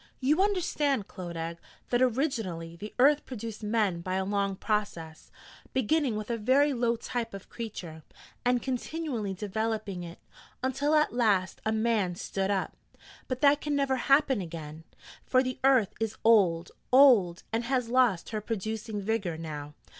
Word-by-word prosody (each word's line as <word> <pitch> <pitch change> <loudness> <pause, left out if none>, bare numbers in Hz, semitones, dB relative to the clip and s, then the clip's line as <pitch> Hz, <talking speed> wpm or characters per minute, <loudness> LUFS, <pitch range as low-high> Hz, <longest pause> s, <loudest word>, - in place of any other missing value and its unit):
You 295 +7 +2
understand, 305 - +1
Clodagh, 170 -2 -6 0.3
that 245 0 +2
originally 225 - -1
the 210 +5 -8
earth 290 +3 +5
produced 230 -3 -7
men 210 -5 0
by 185 +2 -3
a 190 0 0
long 200 -1 0
process, 185 -7 -3 0.4
beginning 260 0 +1
with 215 +2 -4
a 230 - -2
very 275 +6 +3
low 235 -1 +1
type 230 -2 -4
of 195 - -10
creature, 180 -9 -7 0.4
and 245 0 +2
continually 255 -5 -3
developing 215 -1 -3
it, 170 -1 -8 0.5
until 280 +4 +1
at 305 -4 +3
last 205 -6 +1
a - - +2
man 220 -5 +1
stood 195 +2 -2
up. 195 -2 -1 0.5
But 255 -1 -3
that 290 0 +5
can 295 -1 -1
never 275 -2 +1
happen 275 -4 +3
again: 160 -2 -8 0.4
for 255 0 +3
the 255 -1 -4
earth 260 -7 +4
is 225 -1 -2
old, 185 -7 +4 0.2
old, 240 -10 +6
and 230 +1 0
has 250 -1 0
lost 240 -8 +2
her 215 -2 -3
producing 220 0 -4
vigour 195 -6 -1
now. 150 -2 -7
220 Hz, 155 wpm, -29 LUFS, 190-255 Hz, 0.5 s, old